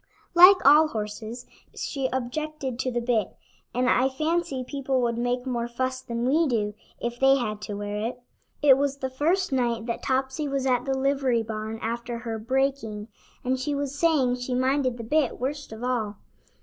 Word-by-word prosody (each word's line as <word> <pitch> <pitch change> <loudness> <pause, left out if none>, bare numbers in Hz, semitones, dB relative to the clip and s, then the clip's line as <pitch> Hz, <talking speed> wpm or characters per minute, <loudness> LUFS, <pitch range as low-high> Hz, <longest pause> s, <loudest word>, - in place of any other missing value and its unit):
Like 360 +3 +9
all 300 +3 +8
horses, 220 0 -5 0.3
she 270 -3 -2
objected 260 0 -3
to 255 - -1
the 240 0 -1
bit, 230 -5 0 0.4
and 250 +1 0
I 255 +1 +3
fancy 310 -1 -1
people 275 -2 -1
would 235 -1 0
make 245 +1 -1
more 240 -2 -2
fuss 255 +2 -2
than 235 -1 -3
we 315 +4 +3
do, 210 -5 0 0.3
if 240 0 -4
they 270 0 +6
had 215 -5 -3
to 210 -1 -5
wear 205 0 -4
it. 245 +1 -6 0.4
It 270 -2 +7
was 280 -1 0
the 265 -1 -4
first 335 +8 +1
night 235 -3 0
that 235 - -3
Topsy 265 +3 -1
was 275 -1 -1
at 250 -2 +1
the 270 -1 0
livery 265 -3 +1
barn 220 0 -5
after 235 +1 -3
her 230 -1 -5
"breaking," 235 -3 -1 0.4
and 260 +1 0
she 290 +2 -1
was 280 -1 -2
saying 285 -5 +2
she 250 0 -3
minded 260 -1 +1
the 230 - -6
bit 285 +3 +1
worst 285 +2 -4
of 220 +2 -8
all. 230 -5 -1
255 Hz, 185 wpm, -26 LUFS, 235-275 Hz, 0.4 s, Like